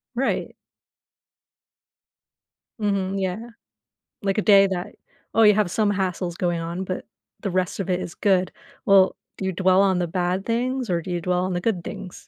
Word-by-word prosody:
Right. 265 Hz, +2 st, -1 dB, 2.3 s
Mhm, 195 Hz, -2 st, -1 dB
yeah, 210 Hz, +6 st, -3 dB, 0.7 s
like 195 Hz, -1 st, 0 dB
a -, -, +3 dB
day 200 Hz, -2 st, +7 dB
that, 185 Hz, -2 st, -4 dB, 0.4 s
oh, 225 Hz, -, +5 dB
you 210 Hz, -1 st, +7 dB
have 205 Hz, -4 st, +1 dB
some 210 Hz, +1 st, +1 dB
hassles 180 Hz, -2 st, -2 dB
going 175 Hz, -3 st, -1 dB
on, 170 Hz, +3 st, -4 dB
but 185 Hz, 0 st, -5 dB, 0.3 s
the 200 Hz, -, -2 dB
rest 185 Hz, +1 st, -1 dB
of 195 Hz, -, -3 dB
it 180 Hz, 0 st, 0 dB
is 175 Hz, -, -6 dB
good. 185 Hz, -3 st, +1 dB, 0.3 s
Well, 195 Hz, -1 st, +5 dB, 0.2 s
do -, -, -4 dB
you 190 Hz, -, 0 dB
dwell 185 Hz, +1 st, +3 dB
on 190 Hz, -2 st, +2 dB
the 175 Hz, -, 0 dB
bad 180 Hz, +2 st, -1 dB
things 245 Hz, 0 st, -1 dB
or 170 Hz, -, +1 dB
do 180 Hz, -, -7 dB
you 175 Hz, -1 st, -1 dB
dwell 180 Hz, +1 st, 0 dB
on 185 Hz, -, -2 dB
the 175 Hz, -, -1 dB
good 185 Hz, -4 st, -1 dB
things? 180 Hz, -, -7 dB
190 Hz, 180 wpm, -23 LUFS, 180-200 Hz, 2.3 s, day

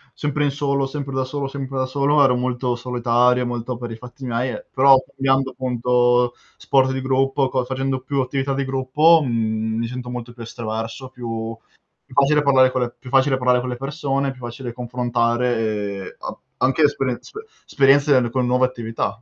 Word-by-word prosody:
sempre 145 Hz, 0 st, -1 dB
in 145 Hz, -, +2 dB
solo, 140 Hz, -1 st, 0 dB
sempre 140 Hz, 0 st, -5 dB
da 130 Hz, -, +1 dB
solo, 140 Hz, +1 st, -3 dB
sempre 135 Hz, -1 st, -5 dB
da 130 Hz, -, +1 dB
solo, 140 Hz, +2 st, +2 dB
ero 125 Hz, -2 st, +4 dB
molto 125 Hz, 0 st, -1 dB
solitario 125 Hz, 0 st, +2 dB
e -, -, -2 dB
molto 120 Hz, 0 st, -4 dB
per 120 Hz, -1 st, -6 dB
i -, -, -5 dB
fatti 125 Hz, +3 st, -10 dB
miei 125 Hz, +1 st, -1 dB
e -, -, -7 dB
però 135 Hz, 0 st, +7 dB
cambiando 135 Hz, 0 st, 0 dB
appunto, 125 Hz, -1 st, +1 dB, 0.2 s
sport 130 Hz, -1 st, +2 dB
di 130 Hz, 0 st, -2 dB
gruppo, 135 Hz, 0 st, +1 dB
co 130 Hz, -1 st, 0 dB
facendo 130 Hz, 0 st, -2 dB
più 140 Hz, +2 st, -2 dB
attività 135 Hz, +1 st, -2 dB
di 135 Hz, 0 st, -1 dB
gruppo, 135 Hz, +5 st, +4 dB
mi 110 Hz, -1 st, -1 dB
sento 125 Hz, +1 st, -6 dB
molto 120 Hz, -1 st, -6 dB
più 120 Hz, -, -12 dB
estroverso, 115 Hz, +2 st, -5 dB
più 115 Hz, -3 st, -5 dB, 0.5 s
più -, -, -17 dB
facile 150 Hz, +2 st, +4 dB
parlare 130 Hz, -2 st, +5 dB
con 130 Hz, 0 st, -1 dB
le 120 Hz, -1 st, -2 dB
più 125 Hz, -, -11 dB
facile 135 Hz, +1 st, +3 dB
parlare 125 Hz, -1 st, +3 dB
con 125 Hz, -, -4 dB
le 125 Hz, -, -4 dB
persone, 140 Hz, 0 st, -2 dB
più 130 Hz, -, -13 dB
facile 120 Hz, 0 st, -6 dB
confrontare 120 Hz, 0 st, 0 dB
e 105 Hz, -3 st, -3 dB
a -, -, -6 dB, 0.2 s
anche 135 Hz, +4 st, +2 dB
esperien 135 Hz, -4 st, +1 dB
spe 435 Hz, +1 st, -10 dB, 0.2 s
esperienze 135 Hz, -2 st, +4 dB
con 125 Hz, +1 st, 0 dB
nuove 125 Hz, +1 st, +3 dB
attività. 115 Hz, -3 st, -4 dB
130 Hz, 185 wpm, -21 LUFS, 120-135 Hz, 0.5 s, però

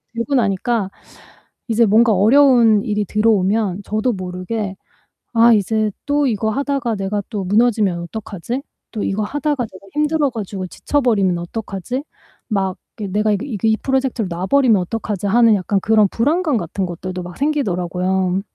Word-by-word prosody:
데고 235 Hz, +5 st, -1 dB
나니까 210 Hz, -2 st, 0 dB, 0.8 s
이제 230 Hz, 0 st, +3 dB
뭔가 220 Hz, +2 st, +4 dB
어려운 230 Hz, 0 st, +5 dB
일이 210 Hz, -3 st, -1 dB
들어오면 205 Hz, -2 st, +1 dB
저도 215 Hz, +5 st, 0 dB
모르게 190 Hz, +2 st, -4 dB, 0.6 s
'아 235 Hz, 0 st, +6 dB
이제 215 Hz, +1 st, +1 dB, 0.2 s
또 290 Hz, 0 st, +2 dB
이거 220 Hz, -1 st, 0 dB
하다가 275 Hz, -1 st, -1 dB
내가 195 Hz, +1 st, -2 dB
또 210 Hz, -4 st, -3 dB
무너지면 205 Hz, -2 st, +2 dB
어떡하지? 220 Hz, +6 st, -5 dB, 0.3 s
또 215 Hz, -, -3 dB
이거 200 Hz, +2 st, -1 dB
하다가 290 Hz, +3 st, -1 dB
내가 190 Hz, +1 st, -14 dB
힘들어 300 Hz, -1 st, +1 dB
가지고 200 Hz, -5 st, -5 dB
지쳐버리면 215 Hz, -8 st, +1 dB
어떡하지? 205 Hz, +7 st, -5 dB, 0.4 s
막 195 Hz, -4 st, -1 dB, 0.2 s
이게 205 Hz, -2 st, -4 dB
내가 210 Hz, +1 st, +2 dB
이게 200 Hz, +2 st, -1 dB
이그 225 Hz, -6 st, -3 dB
이 220 Hz, -, +3 dB
프로젝트를 265 Hz, -6 st, 0 dB
놔 175 Hz, +2 st, -4 dB
버리면 255 Hz, -5 st, +4 dB
어떡하지?' 205 Hz, 0 st, -4 dB
하는 230 Hz, +1 st, +5 dB
약간 200 Hz, 0 st, 0 dB
그런 215 Hz, 0 st, +3 dB
불안감 295 Hz, -, +1 dB
같은 185 Hz, 0 st, -2 dB
것들도 180 Hz, +1 st, -6 dB
막 175 Hz, 0 st, -9 dB
생기더라고요. 185 Hz, -, 0 dB
215 Hz, 355 characters per minute, -19 LUFS, 190-240 Hz, 0.8 s, 아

